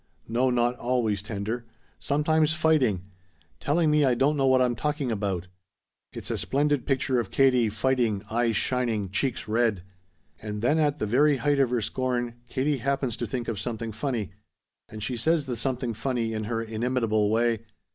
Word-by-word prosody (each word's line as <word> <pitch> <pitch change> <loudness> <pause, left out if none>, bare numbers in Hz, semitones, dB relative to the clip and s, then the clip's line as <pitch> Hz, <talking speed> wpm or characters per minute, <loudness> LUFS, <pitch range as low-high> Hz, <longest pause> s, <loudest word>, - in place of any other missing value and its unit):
No, 125 +3 +1
not 120 0 +1
always 120 -5 0
tender. 105 +3 -4 0.4
Sometimes 155 +2 +2
fighting! 140 - +2 0.6
Telling 155 - +2
me 150 0 +4
I 130 -3 +3
don't 140 +5 +2
know 135 -2 +2
what 130 0 +5
I'm 125 -1 +2
talking 145 +1 -2
about. 100 -4 -2 0.7
It's - - -6
a - - -1
splendid 145 -1 0
picture 130 -2 +1
of 115 - -3
Katie 125 -4 +3
fighting 115 -2 0
eyes 115 0 0
shining, 115 -7 0
cheeks 125 +3 -1
red. 110 -4 +1 0.6
"And 105 0 -5
then 150 +6 +3
at 150 -1 +2
the 110 - -2
very 140 +6 +3
height 145 +3 +1
of 135 -3 +3
her 120 -1 0
scorn, 120 +1 -1 0.2
Katie 140 +2 0
happens 135 -2 -1
to 120 - -3
think 120 +2 -4
of 110 -4 -3
something 115 +1 -4
funny. 110 -4 -3 0.6
And 110 -1 -7
she 125 +1 -2
says 160 +5 +1
the 125 -3 -3
something 125 -1 -2
funny 115 0 -2
in 110 -1 -3
her 115 +1 -2
inimitable 110 -2 0
way. 115 +1 +2
120 Hz, 175 wpm, -26 LUFS, 110-135 Hz, 0.7 s, what